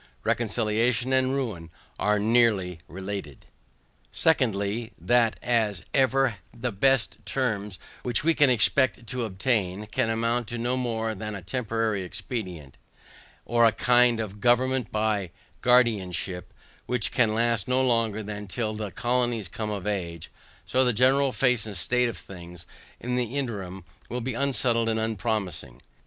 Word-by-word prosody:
Reconciliation 115 +2 +1
and 130 0 +2
ruin 105 -12 -3 0.3
are 105 0 +2
nearly 105 -5 +2
related. 95 -5 -7 0.7
SECONDLY. 115 -6 +1
That 120 -2 +2
as 110 -6 +1
even 135 -4 +2
the 120 0 -4
best 130 +4 +1
terms, 105 -7 -2 0.2
which 120 +1 +1
we 165 +1 +4
can 145 -3 +4
expect 125 +1 +2
to 120 +2 -3
obtain, 100 -1 -1
can 110 +1 -1
amount 115 +1 0
to 120 - -5
no 120 +2 0
more 115 -3 -1
than 105 0 -5
a 95 - -8
temporary 115 -2 -1
expedient, 90 - -6 0.7
or 120 0 +2
a 115 - +6
kind 120 +1 +3
of 105 -2 -5
government 125 0 +2
by 105 -3 0 0.3
guardianship, 95 -8 +2 0.4
which 125 -2 0
can 110 -3 +2
last 115 -2 +1
no 130 +1 +3
longer 115 -3 +1
than 105 0 -6
till 110 +2 -2
the 105 -1 -4
colonies 120 -1 0
come 105 +5 -4
of 100 -3 -4
age, 85 -6 -4 0.3
so 130 +7 +2
the 125 -1 +2
general 130 +4 +4
face 125 -2 +1
and 100 -4 -6
state 125 +7 +1
of 110 - -6
things, 85 -2 -10 0.3
in 125 +1 -2
the 125 +1 -2
interim, 95 -8 -4 0.3
will 125 - -3
be 125 +1 -3
unsettled 120 -3 +1
and 110 0 0
unpromising. 105 - -3
115 Hz, 145 wpm, -26 LUFS, 100-125 Hz, 0.7 s, a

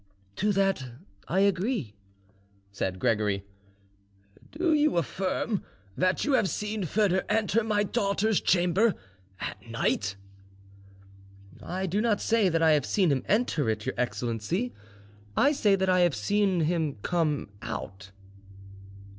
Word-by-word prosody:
"To 210 +2 +1
that 195 -6 +1 0.4
I 190 +3 +1
agree," 195 - 0 0.8
said 95 -2 -3
Gregory. 100 -1 0 1.1
"Do 330 +1 +1
you 300 - +3
affirm 190 +4 -1 0.3
that 185 +1 +1
you 290 - +1
have 215 -7 +3
seen 210 -2 -3
Foedor 190 +1 +2
enter 220 +1 +2
my 210 -1 +1
daughter's 205 0 +1
chamber 180 +5 +3 0.4
at - - -5
night?" 100 0 -1 1.5
"I 185 +2 -3
do 195 +3 0
not 220 -3 +1
say 225 -4 +2
that 165 -1 +1
I 160 - +6
have 150 -3 +3
seen 185 -6 +2
him 135 -2 +1
enter 200 - +1
it, 110 -1 -2
your - - -1
excellency. 125 - -2 0.6
I 280 - +5
say 215 -9 +3
that 190 0 0
I 185 0 +3
have 175 -6 +3
seen 190 - +1
him 160 -2 0
come 155 - 0
out." 95 -1 -6
190 Hz, 130 wpm, -27 LUFS, 150-210 Hz, 1.5 s, I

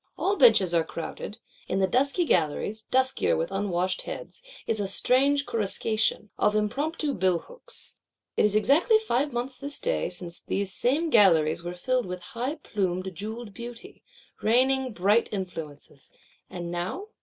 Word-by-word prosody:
All 400 - +1
benches 215 - +6
are 165 -1 +3
crowded; 170 +5 -6 0.3
in 185 - -1
the 195 - +3
dusky 275 - +1
galleries, 185 - 0
duskier 260 0 +2
with 165 +3 -2
unwashed 185 -2 -1
heads, - - -8 0.2
is 220 - 0
a 200 - -1
strange 275 +7 +2
"coruscation,"—of 215 -1 0
impromptu 280 +8 -1
billhooks. 190 - -2 0.4
It - - +3
is 210 -1 +3
exactly 295 - +4
five 290 - 0
months 250 +2 -4
this 285 +1 -6
day - - 0
since 175 -1 -7
these 195 -1 -2
same 300 - +1
galleries 170 -7 +5
were 175 +1 -5
filled 250 +4 0
with 180 0 -5
high 250 +6 -2
plumed 190 - -2
jewelled 215 +3 -6
Beauty, 235 +1 -9 0.4
raining 260 +3 +3
bright 205 +5 +2
influences; 160 -8 -7 0.4
and 175 -1 -6
now? 185 - -4
215 Hz, 145 wpm, -27 LUFS, 185-265 Hz, 0.4 s, benches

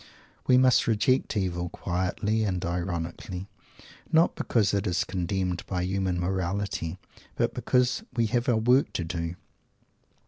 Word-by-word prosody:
We 125 - +6
must 130 0 +4
reject 115 +2 +2
"evil," 90 -3 -1
quietly 95 +6 -1
and 95 -3 -1
ironically; 85 +1 -4 0.6
not 165 +1 +4
because 105 -5 +1
it 100 +1 0
is 90 0 +1
condemned 90 -1 -2
by 90 -2 -1
human 95 -1 -1
morality, 95 -1 -2 0.4
but - - 0
because 125 0 +1 0.2
"we 115 - +3
have 120 +2 0
our 120 - +4
work 125 +5 +3
to 85 - -1
do"! 85 0 -3
95 Hz, 135 wpm, -27 LUFS, 90-110 Hz, 0.6 s, We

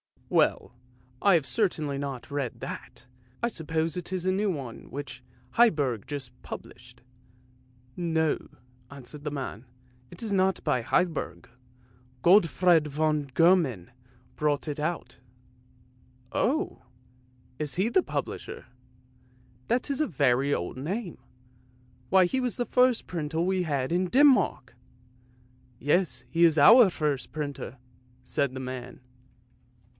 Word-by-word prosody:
" - - -33
Well, - - 0 0.5
I 200 - +5
have 160 -5 +3
certainly 155 -9 0
not 140 -1 -6
read 140 -4 -3
that; - - -8 0.4
I 235 - +2
suppose 160 -4 -2
it 180 0 -5
is 185 -1 -2
a 185 - +3
new 200 +2 +1
one 135 -9 -6
which 135 -1 -7 0.4
Heiberg 145 - +3
has - - -29
just 130 -3 -7
published." 120 -1 -11 0.6
" 125 0 -32
No," 160 -3 0 0.4
answered 140 +2 -11
the - - 0
man; 135 -5 -6 0.2
" 125 0 -32
It 175 - -8
is 215 -3 -2
not 190 -1 +1
by 150 -5 +1
Heiberg. 165 +6 -1 0.8
Gottfred 175 -3 +5
von 150 +1 0
Gehman 140 - +2 0.5
brought 145 -3 0
it 150 - -4
out." 155 -4 -3 0.6
" 125 0 -32
Oh, 315 +9 0 0.8
is 150 -3 -2
he 195 +5 +1
the 370 - +3
publisher? - - -5 1.0
That 250 +4 0
is 280 - -1
a 305 - +2
very 140 - +2
old 90 +8 -3
name! 180 - -4 0.9
Why, 190 0 +6
he 260 +9 -1
was 250 -2 -1
the 245 - -1
first 250 -1 +3
printer 160 -2 -3
we 185 +1 +1
had 140 -5 -1
in 180 +2 +2
Denmark! 255 - +3 0.3
" 125 0 -32
" - - -33 0.3
Yes; 170 +7 +1
he 170 0 +2
is 160 -2 +4
our 225 - +8
first 150 -6 -2
printer," 145 -3 -5 0.5
said 130 +1 -1
the 130 - -5
man. 125 -1 -7
150 Hz, 140 wpm, -27 LUFS, 130-185 Hz, 1.0 s, our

